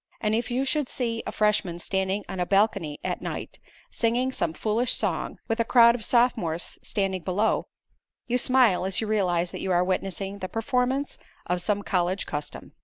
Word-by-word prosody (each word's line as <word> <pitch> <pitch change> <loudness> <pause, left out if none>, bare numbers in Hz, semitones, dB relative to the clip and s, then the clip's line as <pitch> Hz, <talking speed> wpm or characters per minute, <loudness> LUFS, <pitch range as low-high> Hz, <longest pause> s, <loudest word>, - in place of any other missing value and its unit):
And 215 0 0
if 230 +2 0
you 255 +3 0
should 290 -1 0
see 230 -3 -2
a - - -2
freshman 210 -5 +1
standing 190 +3 -1
on 190 -1 -5
a 180 - +1
balcony 195 -7 +2
at - - -2
night, - - -6 0.3
singing 245 +3 +1
some 170 - -1
foolish 220 +7 +1
song, - - -2
with 225 0 -1
a - - +4
crowd 235 0 +6
of 235 -2 -4
sophomores 220 -10 +1
standing 195 -2 -1
below, 195 +5 0 0.6
you 250 +1 +1
smile 250 -8 +4
as 190 -1 0
you 225 - -1
realize 180 -5 +1
that - - -6
you 190 - -2
are 175 0 +3
witnessing 195 +1 -2
the 185 - -4
performance 255 +4 -1 0.3
of 180 0 -1
some 205 +2 0
college 185 0 0
custom. 145 0 -6
210 Hz, 180 wpm, -26 LUFS, 185-235 Hz, 0.6 s, crowd